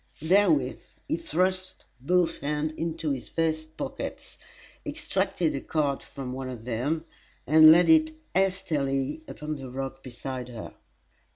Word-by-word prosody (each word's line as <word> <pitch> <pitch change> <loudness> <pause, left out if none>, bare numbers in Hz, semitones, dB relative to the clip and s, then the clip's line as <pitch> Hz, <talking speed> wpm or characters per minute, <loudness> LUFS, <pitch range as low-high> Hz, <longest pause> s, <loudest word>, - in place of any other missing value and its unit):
Therewith 160 -7 +2
he - - +1
thrust 185 +3 -1
both 175 +6 +2
hands 150 +2 -1
into 165 -2 -2
his 130 -3 -4
vest 160 -1 -1
pockets, - - -6 0.4
extracted 160 -5 -1
a 135 - -3
card 145 -3 0
from 130 -2 -7
one 130 0 -4
of 120 -3 -8
them, 135 +7 -1 0.4
and 155 +1 +9
laid 175 +2 +6
it 315 -1 +5 0.2
hastily 160 - 0
upon 155 - -5
the 135 -2 -8
rock 135 +1 -5
beside 130 0 -6
her. 115 -3 -8
155 Hz, 130 wpm, -27 LUFS, 135-170 Hz, 0.4 s, and